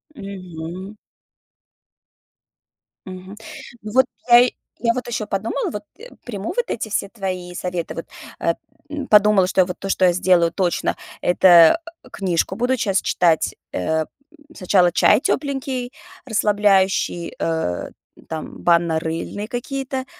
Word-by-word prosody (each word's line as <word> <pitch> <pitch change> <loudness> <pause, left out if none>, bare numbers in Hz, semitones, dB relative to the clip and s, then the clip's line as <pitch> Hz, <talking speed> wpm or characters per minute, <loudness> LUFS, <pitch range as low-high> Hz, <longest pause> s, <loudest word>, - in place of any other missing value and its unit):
Мгм. 185 -2 -8 2.1
Мгм. 185 +1 -9 0.5
Ну, 210 - -7
вот 260 0 +5 0.2
я 240 +1 +8 0.3
я 230 0 +3
вот 255 - -4
ещё 225 -3 -3
подумала, 200 +2 -2
вот, 210 -1 -6 0.2
э, - - -11 0.2
приму 210 -3 -5
вот 485 - +3
эти 220 - -3
все 200 -1 -1
твои 185 -4 -5
советы, 180 -1 -4
вот, 165 - -7 0.3
э, 170 - +1 0.3
м, 295 -2 -4
подумала, 210 -2 +5
что 185 0 +2
я - - +3
вот 180 0 -6
то, 195 - -6
что 190 -1 +3
я 180 - +5
сделаю 175 -2 +3
точно,- 180 -1 -1 0.2
это, 175 - +6 0.2
э, - - -16
книжку 185 -1 -1
буду 250 +3 +1
час 200 -3 +1
читать. 170 -3 +2 0.2
Э, 160 - 0
м, 155 - -4 0.5
сначала 180 -1 +3
чай 210 - +4
тёпленький, 270 -3 -2 0.3
расслабляющий, 200 -6 +1
э, 160 - -2 0.4
там 160 -1 -6
банно-рыльные 170 +4 0
какие-то, 260 +2 -4
195 Hz, 135 wpm, -21 LUFS, 175-225 Hz, 2.1 s, я